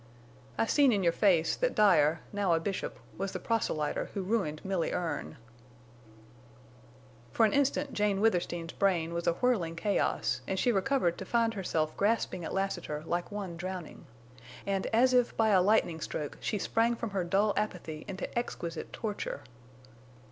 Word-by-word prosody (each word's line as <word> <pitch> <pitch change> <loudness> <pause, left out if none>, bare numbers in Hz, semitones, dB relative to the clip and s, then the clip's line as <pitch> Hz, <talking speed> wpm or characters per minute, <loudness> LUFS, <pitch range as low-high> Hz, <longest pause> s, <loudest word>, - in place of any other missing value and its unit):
"I - - +2
seen 280 +2 +4
in 200 -4 +1
your 170 -1 +3
face 175 -6 +3
that - - 0
Dyer, 165 -6 +4
now 200 -4 +1
a 165 - +3
bishop, 190 +3 -3 0.2
was 195 0 -2
the - - -3
proselyter 160 -10 -1
who 195 - -2
ruined 185 -7 -1
Milly 190 -3 0
Erne!" 165 -3 -3 1.9
For 225 - +4
an 210 - +1
instant 280 0 +1
Jane 205 -2 +1
Withersteen's 175 -5 0
brain 170 -4 +1
was 170 0 -3
a 170 - +4
whirling 180 -6 0
chaos 205 +4 0
and 190 - -1
she 245 - +2
recovered 195 -4 +1
to - - -5
find 230 -1 +1
herself 160 -6 -1
grasping 205 -4 0
at - - -4
Lassiter 175 -6 -2
like 175 +3 -2
one 200 -4 -5
drowning. 180 -3 -6 0.6
And 195 -1 -1
as 255 +3 +3
if 245 -1 +2
by 225 -1 +3
a 190 -3 +5
lightning 180 -5 +2
stroke 150 -2 -4
she 210 - -1
sprang 230 +4 +1
from 230 -2 -5
her 195 -2 -1
dull 200 +4 +2
apathy 170 -7 -3
into 190 0 -4
exquisite 170 -8 -4
torture. 210 -2 -4
195 Hz, 160 wpm, -30 LUFS, 170-220 Hz, 1.9 s, a